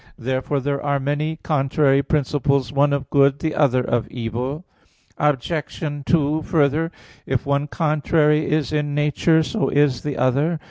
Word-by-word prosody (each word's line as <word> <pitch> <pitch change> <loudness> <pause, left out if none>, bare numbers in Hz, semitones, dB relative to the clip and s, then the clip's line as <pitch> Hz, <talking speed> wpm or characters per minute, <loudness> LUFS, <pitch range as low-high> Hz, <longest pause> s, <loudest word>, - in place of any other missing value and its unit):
Therefore 130 +3 -2
there 140 +1 -2
are 140 -1 0
many 145 +3 -2
contrary 140 -1 +2
principles, 140 -3 0
one 140 +1 +3
of 140 -2 -3
good, 140 -1 +4
the 155 0 -2
other 130 -4 +2
of 120 -2 -1
evil. 125 +7 -4 0.5
Obj. 150 +2 -1 0.3
2: 155 -2 +2
Further, 155 +1 +1 0.4
if 130 +1 -1
one 140 +1 0
contrary 150 0 +1
is 155 -2 0
in 145 -1 -1
nature, 150 +2 +2
so 220 +6 -1
is 140 -4 +2
the 145 -2 -4
other. 145 +6 +1
145 Hz, 145 wpm, -21 LUFS, 135-150 Hz, 0.5 s, good